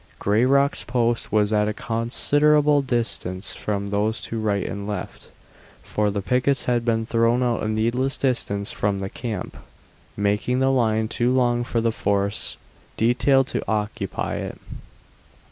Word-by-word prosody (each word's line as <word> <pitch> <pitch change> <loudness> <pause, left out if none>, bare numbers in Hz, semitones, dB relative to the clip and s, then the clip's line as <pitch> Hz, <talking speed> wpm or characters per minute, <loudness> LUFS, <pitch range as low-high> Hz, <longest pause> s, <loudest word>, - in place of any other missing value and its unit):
Grayrock's 130 +7 +2
post 120 -2 -1
was 105 0 +2
at 105 0 +2
a 105 - -2
considerable 145 +6 +2
distance 115 -7 -2
from 100 -1 -3
those 105 +2 0
to 115 - -4
right 100 -3 0
and 100 -2 -5
left, 105 - -6 0.5
for 105 -1 0
the 100 -1 -3
pickets 125 +5 +1
had 120 -1 +1
been 115 -1 0
thrown 115 +2 +2
out 120 -2 0
a - - -1
needless 120 +5 0
distance 100 -6 0
from 100 -1 -1
the 95 0 -5
camp, 110 -6 -5 0.6
making 105 +5 0
the 135 0 +3
line 110 -4 +1
too 120 +2 +1
long 120 -2 +2
for 120 -1 -1
the 115 0 +1
force 100 -2 0 0.4
detailed 130 +4 +3
to - - -3
occupy 105 -1 -2
it. - - -5
115 Hz, 145 wpm, -23 LUFS, 105-125 Hz, 0.6 s, the